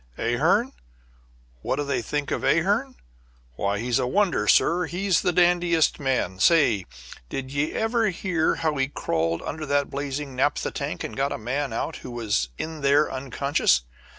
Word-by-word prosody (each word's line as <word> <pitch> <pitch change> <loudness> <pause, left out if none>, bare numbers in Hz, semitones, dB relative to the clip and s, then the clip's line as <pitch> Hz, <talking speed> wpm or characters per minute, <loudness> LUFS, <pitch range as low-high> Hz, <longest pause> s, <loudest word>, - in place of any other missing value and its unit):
Ahearn? - - +1 0.9
What - - -1
do 145 - -2
they 140 - -1
think 145 -1 -3
of - - -2
Ahearn? - - +1 0.6
Why, 100 +10 -1
he's 120 +2 0
a 125 - 0
wonder, 180 - +1
sir; 175 +9 +4
he's 180 +2 0
the 180 - +1
dandiest 175 -2 +3
man. 130 -9 -1
Say, 120 - +4 0.4
did 135 -1 -5
ye 145 +2 -1
ever 225 0 +1
hear 175 -3 0
how 155 -3 -1
he 135 0 +1
crawled 85 - -2
under 155 -1 -5
that 145 0 0
blazing 140 -1 -4
naphtha 145 +3 0
tank 145 +2 -4
and - - -6
got 140 +1 0
a - - -2
man 130 +4 -2
out 115 - -3
who - - -9
was 105 - -1
in 160 -1 -5
there 140 +2 +3
unconscious? 135 - +1
145 Hz, 165 wpm, -25 LUFS, 125-165 Hz, 0.9 s, sir